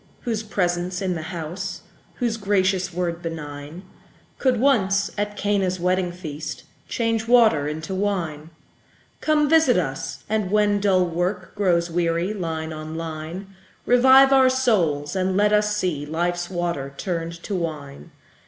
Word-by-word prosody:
whose 225 Hz, -3 st, -2 dB
presence 180 Hz, -4 st, -1 dB
in 190 Hz, -2 st, -1 dB
the 165 Hz, -, -4 dB
house, 175 Hz, +3 st, -5 dB, 0.3 s
Whose 240 Hz, -3 st, -1 dB
gracious 195 Hz, -3 st, +1 dB
word 170 Hz, -1 st, -2 dB
benign, 155 Hz, 0 st, -7 dB, 0.6 s
Could 255 Hz, -3 st, +2 dB
once, 200 Hz, -7 st, +2 dB
at 205 Hz, 0 st, -3 dB
Cana's 195 Hz, -3 st, 0 dB
wedding 180 Hz, 0 st, +1 dB
feast, 155 Hz, -3 st, -7 dB, 0.2 s
Change 230 Hz, -1 st, -1 dB
water 225 Hz, -12 st, +5 dB
into 155 Hz, +4 st, -4 dB
wine; 175 Hz, -6 st, -2 dB, 0.7 s
Come, 300 Hz, -1 st, +2 dB
visit 315 Hz, -, +4 dB
us! 135 Hz, -4 st, -3 dB
and 215 Hz, -3 st, -1 dB
when 205 Hz, 0 st, +2 dB
dull 190 Hz, -3 st, +3 dB
work 180 Hz, +2 st, -2 dB
Grows 175 Hz, -4 st, +1 dB
weary, 170 Hz, +3 st, 0 dB
line 160 Hz, -5 st, -4 dB
on 155 Hz, +1 st, -7 dB
line, 165 Hz, +4 st, -6 dB, 0.3 s
Revive 265 Hz, +2 st, +6 dB
our 265 Hz, -1 st, +6 dB
souls, 180 Hz, -, +1 dB
and 190 Hz, 0 st, 0 dB
let 210 Hz, +1 st, +3 dB
us 210 Hz, 0 st, +2 dB
see 175 Hz, -8 st, -1 dB
Life's 175 Hz, +3 st, -2 dB
water 170 Hz, -6 st, -3 dB
turned 170 Hz, -3 st, -3 dB
to 205 Hz, -, -4 dB
wine. 150 Hz, -, -5 dB
185 Hz, 140 wpm, -23 LUFS, 165-210 Hz, 0.7 s, Revive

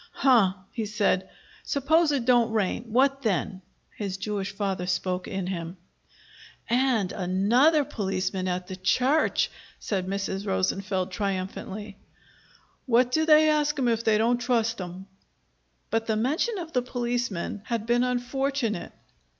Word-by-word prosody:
"Huh!" 250 Hz, -, +4 dB, 0.2 s
he 225 Hz, -3 st, -3 dB
said. 200 Hz, -3 st, 0 dB, 0.3 s
"Suppose 310 Hz, +3 st, +2 dB
it 270 Hz, -5 st, 0 dB
don't 240 Hz, -2 st, +4 dB
rain. 220 Hz, +2 st, -1 dB
What 270 Hz, +4 st, +2 dB
then?" 190 Hz, -4 st, -1 dB, 0.3 s
His 195 Hz, -3 st, -4 dB
Jewish 205 Hz, -1 st, -3 dB
father 195 Hz, -3 st, -2 dB
spoke 180 Hz, 0 st, -1 dB
in 190 Hz, -1 st, -3 dB
him. 175 Hz, -1 st, -5 dB, 0.9 s
"And 240 Hz, -5 st, +2 dB
another 230 Hz, -, +3 dB
policeman 190 Hz, -3 st, -2 dB
at 180 Hz, 0 st, -2 dB
the 185 Hz, -, -7 dB
church!" 255 Hz, +11 st, +2 dB, 0.3 s
said 190 Hz, -3 st, -3 dB
Mrs. 195 Hz, +1 st, -3 dB
Rosenfeld 190 Hz, 0 st, -1 dB
triumphantly. 195 Hz, +1 st, -4 dB, 0.9 s
"Why 240 Hz, 0 st, +5 dB
do 315 Hz, +6 st, 0 dB
they 310 Hz, 0 st, +7 dB
ask 300 Hz, 0 st, +1 dB
'em 260 Hz, -3 st, +1 dB
if 230 Hz, 0 st, 0 dB
they 220 Hz, -2 st, +3 dB
don't 235 Hz, +3 st, +2 dB
trust 230 Hz, -3 st, 0 dB
'em?" 180 Hz, +1 st, -7 dB, 0.9 s
But 225 Hz, +1 st, 0 dB
the 220 Hz, -, +1 dB
mention 300 Hz, -, 0 dB
of 335 Hz, -3 st, -7 dB
the 250 Hz, -, +2 dB
policemen 240 Hz, -6 st, -3 dB
had 230 Hz, -3 st, -2 dB
been 240 Hz, +1 st, +2 dB
unfortunate. 250 Hz, -3 st, -1 dB
220 Hz, 135 wpm, -26 LUFS, 190-250 Hz, 0.9 s, they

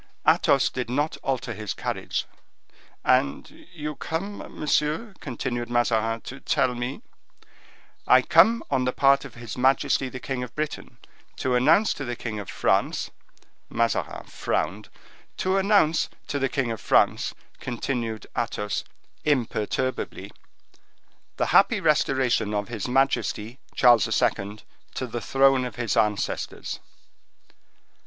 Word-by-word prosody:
Athos 135 Hz, -, +4 dB
did 125 Hz, -2 st, -4 dB
not 145 Hz, +5 st, 0 dB
alter 135 Hz, -2 st, -2 dB
his 105 Hz, -3 st, -5 dB
carriage. -, -, -3 dB, 0.8 s
"And 70 Hz, -, 0 dB
you 150 Hz, -3 st, -5 dB
come, 190 Hz, +9 st, -4 dB, 0.2 s
monsieur," 150 Hz, +8 st, 0 dB
continued 120 Hz, -2 st, -4 dB
Mazarin, 115 Hz, -1 st, +1 dB
"to 135 Hz, -, -9 dB
tell 130 Hz, -1 st, +1 dB
me—" 125 Hz, -, -5 dB, 1.0 s
"I -, -, +6 dB
come 230 Hz, +1 st, +5 dB
on 130 Hz, -2 st, +2 dB
the 125 Hz, -, 0 dB
part 140 Hz, 0 st, +4 dB
of 135 Hz, -, -11 dB
his 120 Hz, -2 st, -7 dB
majesty 135 Hz, +1 st, +2 dB
the 130 Hz, -, -7 dB
king 130 Hz, 0 st, -3 dB
of 125 Hz, -1 st, -7 dB
Great 155 Hz, 0 st, -1 dB
Britain -, -, -11 dB, 0.4 s
to 130 Hz, -, -1 dB
announce 155 Hz, -, +4 dB
to 145 Hz, -, -6 dB
the 120 Hz, -1 st, -3 dB
king 110 Hz, -3 st, -5 dB
of 100 Hz, -, -7 dB
France"—Mazarin 115 Hz, 0 st, -2 dB
frowned—"to 185 Hz, +1 st, -3 dB
announce 195 Hz, -5 st, +3 dB, 0.2 s
to 140 Hz, -, -2 dB
the 135 Hz, 0 st, +1 dB
king 130 Hz, -4 st, -1 dB
of 115 Hz, -, -5 dB
France," -, -, +2 dB, 0.2 s
continued 120 Hz, -3 st, -3 dB
Athos, 105 Hz, -3 st, -2 dB, 0.4 s
imperturbably, 130 Hz, -2 st, -1 dB, 1.1 s
"the -, -, +1 dB
happy 230 Hz, -4 st, +5 dB
restoration 130 Hz, -, +2 dB
of 105 Hz, +1 st, -2 dB
his 115 Hz, -3 st, -4 dB
majesty 125 Hz, -2 st, 0 dB, 0.2 s
Charles 120 Hz, -5 st, +6 dB
II. 100 Hz, +2 st, 0 dB, 0.3 s
to 130 Hz, -, -2 dB
the 120 Hz, -1 st, -5 dB
throne 135 Hz, -1 st, +3 dB
of 125 Hz, -, -5 dB
his 115 Hz, -4 st, -1 dB
ancestors." 105 Hz, -1 st, -1 dB
130 Hz, 125 wpm, -25 LUFS, 115-140 Hz, 1.1 s, I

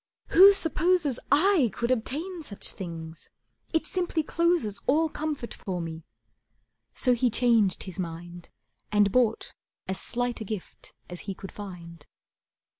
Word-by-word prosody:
"Who 385 Hz, +4 st, +9 dB
supposes 325 Hz, -5 st, +1 dB
I 310 Hz, -, +4 dB
could 235 Hz, +1 st, -2 dB
obtain 310 Hz, +9 st, -2 dB
such 210 Hz, -10 st, -3 dB
things! 165 Hz, -3 st, -8 dB, 0.4 s
It 320 Hz, -2 st, +1 dB
simply 350 Hz, -2 st, -1 dB
closes 335 Hz, -, 0 dB
All 315 Hz, +4 st, +3 dB
comfort 295 Hz, -7 st, -4 dB
for 185 Hz, -2 st, -5 dB
me." 165 Hz, -1 st, -6 dB, 0.9 s
So 250 Hz, -, +3 dB
he 245 Hz, +1 st, +2 dB
changed 230 Hz, -5 st, +2 dB
his 190 Hz, 0 st, -9 dB
mind 175 Hz, 0 st, -7 dB, 0.4 s
And 205 Hz, -1 st, +4 dB
bought 235 Hz, -2 st, +1 dB, 0.3 s
as 190 Hz, 0 st, -2 dB
slight 245 Hz, -1 st, -2 dB
a -, -, -1 dB
gift 210 Hz, -3 st, -8 dB
as 175 Hz, 0 st, -8 dB
he 195 Hz, -, -3 dB
could 195 Hz, -, -9 dB
find. 170 Hz, -6 st, -10 dB
235 Hz, 135 wpm, -27 LUFS, 185-310 Hz, 0.9 s, Who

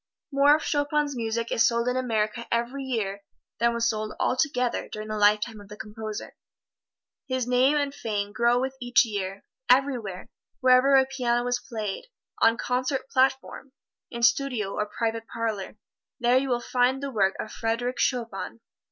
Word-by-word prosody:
More 285 Hz, +1 st, +5 dB
of 310 Hz, -, -3 dB
Chopin's 290 Hz, -1 st, 0 dB
music 230 Hz, 0 st, -2 dB
is -, -, +1 dB
sold 235 Hz, 0 st, 0 dB
in 250 Hz, -, +1 dB
America 235 Hz, -2 st, -1 dB
every 240 Hz, +4 st, -1 dB
year 205 Hz, -6 st, -2 dB, 0.4 s
than 235 Hz, +1 st, +3 dB
was 235 Hz, 0 st, 0 dB
sold 215 Hz, -2 st, -2 dB
altogether 250 Hz, -2 st, 0 dB
during 215 Hz, 0 st, -7 dB
the 215 Hz, -, -2 dB
lifetime 210 Hz, +1 st, +2 dB
of 200 Hz, -, -14 dB
the 210 Hz, +1 st, -11 dB
composer. 215 Hz, 0 st, -7 dB, 0.9 s
His 260 Hz, -2 st, -1 dB
name 255 Hz, +4 st, +3 dB
and 285 Hz, -1 st, -1 dB
fame 205 Hz, -5 st, -3 dB
grow 240 Hz, +1 st, +3 dB
with 265 Hz, +1 st, -2 dB
each 245 Hz, 0 st, +4 dB
year. 195 Hz, -3 st, -4 dB, 0.3 s
Everywhere 245 Hz, -8 st, +1 dB, 0.3 s
wherever 255 Hz, +2 st, +5 dB
a 265 Hz, 0 st, +6 dB
piano 245 Hz, -2 st, 0 dB
is 245 Hz, 0 st, 0 dB
played 215 Hz, -, -5 dB, 0.4 s
on 230 Hz, 0 st, +5 dB
concert 255 Hz, +2 st, -2 dB
platform, 265 Hz, 0 st, 0 dB, 0.4 s
in 235 Hz, -1 st, -6 dB
studio 235 Hz, -4 st, +2 dB
or 210 Hz, -, -2 dB
private 225 Hz, +1 st, -3 dB
parlor, 220 Hz, -3 st, -4 dB, 0.4 s
there 240 Hz, +1 st, +3 dB
you 270 Hz, 0 st, -3 dB
will 240 Hz, -1 st, 0 dB
find 255 Hz, +3 st, +1 dB
the 280 Hz, -, -3 dB
work 195 Hz, -5 st, +2 dB
of -, -, -5 dB
Frederic 235 Hz, +3 st, -2 dB
Chopin. 230 Hz, -3 st, -2 dB
240 Hz, 160 wpm, -26 LUFS, 220-260 Hz, 0.9 s, a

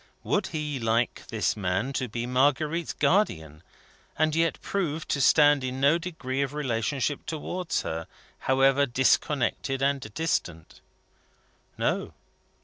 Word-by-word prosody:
Would 200 Hz, -2 st, 0 dB
he 150 Hz, -3 st, -3 dB
like 115 Hz, +1 st, 0 dB
this 110 Hz, -2 st, 0 dB
man 100 Hz, +6 st, -1 dB
to 130 Hz, -, -1 dB
be 115 Hz, +1 st, -4 dB
Marguerite's 145 Hz, +6 st, +1 dB
Guardian, 80 Hz, -, 0 dB, 0.6 s
and 155 Hz, 0 st, +2 dB
yet 165 Hz, 0 st, +1 dB
proved 165 Hz, -5 st, -2 dB
to 140 Hz, -, 0 dB
stand 145 Hz, -1 st, +5 dB
in 130 Hz, 0 st, -3 dB
no 140 Hz, +5 st, +4 dB
degree 140 Hz, -7 st, -4 dB
of 140 Hz, +1 st, -2 dB
relationship 135 Hz, +1 st, -1 dB
towards 165 Hz, +2 st, -3 dB
her, 80 Hz, 0 st, -4 dB, 0.4 s
however 135 Hz, +1 st, +4 dB
disconnected 130 Hz, +1 st, +1 dB
and 140 Hz, 0 st, +1 dB
distant? 90 Hz, -, -2 dB, 1.0 s
No. -, -, -1 dB
135 Hz, 125 wpm, -27 LUFS, 120-155 Hz, 1.0 s, stand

